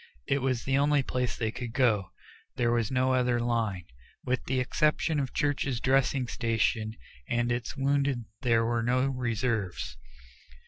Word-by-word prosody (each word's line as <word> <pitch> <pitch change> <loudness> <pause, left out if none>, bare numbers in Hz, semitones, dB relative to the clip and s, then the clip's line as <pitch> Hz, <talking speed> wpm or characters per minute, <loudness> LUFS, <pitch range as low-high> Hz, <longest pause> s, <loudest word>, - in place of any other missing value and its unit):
It 140 - +1
was 130 -2 0
the 135 0 +1
only 145 -1 +3
place 125 -1 -2
they 110 -2 -1
could 120 -1 -6
go 110 -7 +2 0.5
there 120 -1 +1
was 115 -3 +1
no 130 0 +2
other 125 -1 +2
line. 115 -6 -1 0.4
With 130 -1 0
the 130 0 0
exception 150 +3 +1
of 135 -2 -2
Church's 140 -4 0
dressing 130 0 +2
station 115 -1 0 0.3
and 120 0 +1
its 120 +3 -3
wounded 135 -3 +1 0.2
there 115 -2 +3
were 120 0 0
no 125 +3 +2
reserves. 115 -6 -2
125 Hz, 150 wpm, -29 LUFS, 115-135 Hz, 0.5 s, only